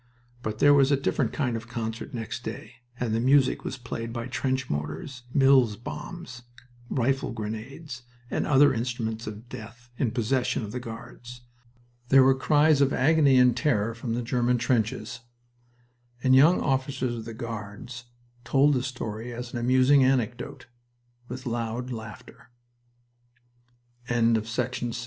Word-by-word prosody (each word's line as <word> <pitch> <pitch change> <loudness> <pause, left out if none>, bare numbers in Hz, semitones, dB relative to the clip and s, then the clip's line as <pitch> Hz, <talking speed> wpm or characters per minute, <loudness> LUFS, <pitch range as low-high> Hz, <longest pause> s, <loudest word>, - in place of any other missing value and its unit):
But 110 -2 -4
there 145 +4 +6
was 140 0 +4
a 140 - +4
different 135 - 0
kind 130 -6 -1
of 115 +1 -6
concert 115 -1 -5
next 120 0 -5
day, 115 0 -7 0.2
and 120 -3 -1
the 115 - +1
music 130 +2 +3
was 135 - -4
played 115 -2 -6
by 115 0 -4
trench 130 0 -2
mortars, 125 - -5
Mills 135 -5 +4
bombs, 125 - -8 0.5
rifle 135 +2 0
grenades, 120 +5 -6 0.3
and - - -1
other 145 0 +5
instruments 115 -2 -3
of 110 +2 -8
death 120 +2 -11
in 130 - +2
possession 125 +2 0
of 105 - -6
the 125 - -4
Guards. 120 +1 -10 0.7
There 135 -1 +7
were 135 +1 +5
cries 150 +2 +3
of 140 -1 +3
agony 140 -1 +4
and 125 -2 +5
terror 115 -4 +1
from 115 0 -4
the 120 - -2
German 125 0 +1
trenches, 115 -1 -1 1.0
and 130 0 +5
young 155 +7 +6
officers 130 -2 -1
of 115 -2 -6
the 115 -1 -7
Guards 115 +1 -7 0.4
told 135 +5 +3
the 130 - +1
story 120 -3 -5
as 120 0 -7
an 120 - -2
amusing 130 +3 +4
anecdote, 125 -2 -1 0.6
with 125 +1 -7
loud 120 +1 -3
laughter. 110 -1 -9 1.6
XVI 120 -1 +2
It 115 - +4
was 110 - -8
astonishing 120 0 -2
how - - -4
125 Hz, 155 wpm, -26 LUFS, 115-130 Hz, 1.6 s, There